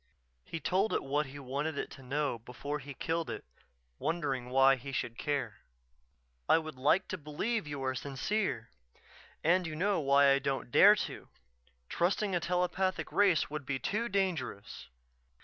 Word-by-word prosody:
_" - - -43 0.5
He 165 - -4
told 190 +7 +1
it - - 0
what 145 +2 0
he 135 +2 -10
wanted 140 +3 -3
it - - -3
to 135 - -11
know 135 -1 -1
before 140 +6 -5
he 140 0 -9
killed 165 +3 -2
it, - - -6 0.5
wondering 135 -7 -2
why 135 +1 +6
he 135 +2 -8
should 120 -3 -3
care: 135 -6 -2 0.9
"I - - +7
would 155 -1 -4
like 150 +9 +2
to 185 - -4
believe 155 +7 -2
you 145 -2 -5
are 130 0 0
sincere 135 - -2 0.7
and 175 +2 +3
you 155 - -5
know 195 +3 +1
why 140 -1 +5
I 135 - +4
don't 135 -2 -3
dare 205 +9 +8
to. - - -9 0.6
Trusting 190 - 0
a 175 - +2
telepathic 180 +2 -1
race 195 -7 +3
would 150 -1 -4
be 135 0 -2
too 225 - -2
dangerous. 185 - -2
150 Hz, 165 wpm, -32 LUFS, 135-180 Hz, 0.9 s, dare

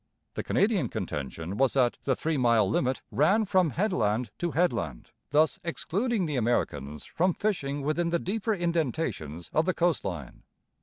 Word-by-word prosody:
The - - -3
Canadian 200 - +1
contention 80 +7 -4
was 135 -1 +3
that 125 -3 +2
the 135 - +2
three 160 0 -1
mile 115 -6 +3
limit 130 +6 0
ran 195 +10 +3
from 185 -4 +3
headland 125 - 0
to 175 - 0
headland, 120 - -1 0.2
thus 155 +3 +3
excluding 195 +5 -1
the 150 -4 -2
Americans 75 - -1
from 180 +1 0
fishing 145 -9 -1
within 170 +4 0
the 170 - +2
deeper 215 +5 -1
indentations 150 - -2
of 155 - +3
the 185 - +1
coast 175 -3 +1
line. 85 -10 -6
150 Hz, 155 wpm, -28 LUFS, 115-175 Hz, 0.2 s, was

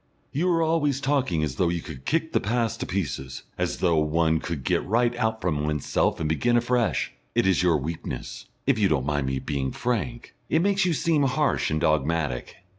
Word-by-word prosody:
"You 170 +6 +1
are 165 -2 +3
always 150 -4 +1
talking 135 - +1
as 70 -5 -3
though 90 - +2
you 85 0 -1
could 70 -5 -9
kick 160 0 0
the - - +4
past 115 +1 -1
to - - -3
pieces; 70 -8 -3
as - - -2
though 85 -3 +2
one 80 +1 +2
could 80 -6 -4
get - - +1
right 120 +3 +1
out 110 -2 0
from 75 -5 0
oneself 75 0 0
and 80 - -1
begin 120 +10 +2
afresh. 120 0 +1 0.2
It - - +3
is 95 -3 +3
your 85 -3 +3
weakness 80 +3 -6 0.2
if 135 -4 +2
you 100 - +4
don't 70 -5 +1
mind 75 -2 0
my 65 0 -1
being 65 0 -2
frank 120 -2 -3 0.2
it 160 +2 +3
makes 195 -1 +2
you 175 - +2
seem 160 0 +1
harsh 140 +2 +1
and 80 - 0
dogmatic. 75 -4 0
90 Hz, 200 wpm, -25 LUFS, 75-130 Hz, 0.2 s, the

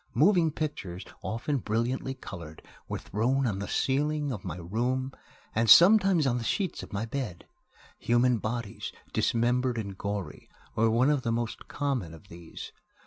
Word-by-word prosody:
Moving 175 0 +5
pictures, 125 - -4 0.2
often 120 +6 -2
brilliantly 120 +4 -1
colored, 85 -10 -9 0.2
were - - -3
thrown 130 +6 0
on 100 -5 -1
the 100 - -4
ceiling 145 +2 0
of 105 -6 -5
my 90 -3 -5
room 120 +9 -1 0.4
and 115 +1 +1
sometimes 190 - +7
on 125 -2 +1
the - - -4
sheets 180 - -1
of - - -10
my 100 +2 -2
bed. 115 -7 -5 0.5
Human 120 0 +3
bodies, 110 -2 -4 0.2
dismembered 120 +1 +1
and 100 -3 -4
gory, 100 -1 -5 0.2
were 115 +1 +3
one 125 +6 +3
of 145 -3 +1
the 115 -3 -1
most 115 -1 -3
common 130 - -2
of 90 +4 -17
these. 85 -1 -9
120 Hz, 155 wpm, -28 LUFS, 105-135 Hz, 0.5 s, sometimes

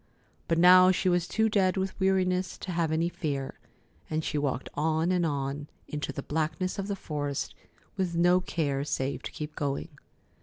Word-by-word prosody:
But 165 - +1
now 185 +1 +8
she 185 0 +2
was 175 -1 +1
too 220 0 +2
dead 195 -3 +2
with 190 +1 -2
weariness 185 -1 +1
to 185 - -6
have 165 -2 0
any 160 +2 +1
fear, 140 -5 -4 0.5
and 155 0 -1
she - - -3
walked 135 -3 -1
on 160 +3 +1
and 175 -2 +2
on 140 0 -3 0.2
into 150 0 -3
the 140 - -6
blackness 160 +5 -2
of 195 - -3
the 200 - -1
forest, 145 -6 -3 0.4
with 180 -3 -1
no 175 +2 +5
care 145 -6 -1
save 140 -1 -2
to - - -6
keep 150 0 -6
going. 140 +3 -2
165 Hz, 180 wpm, -28 LUFS, 145-185 Hz, 0.5 s, now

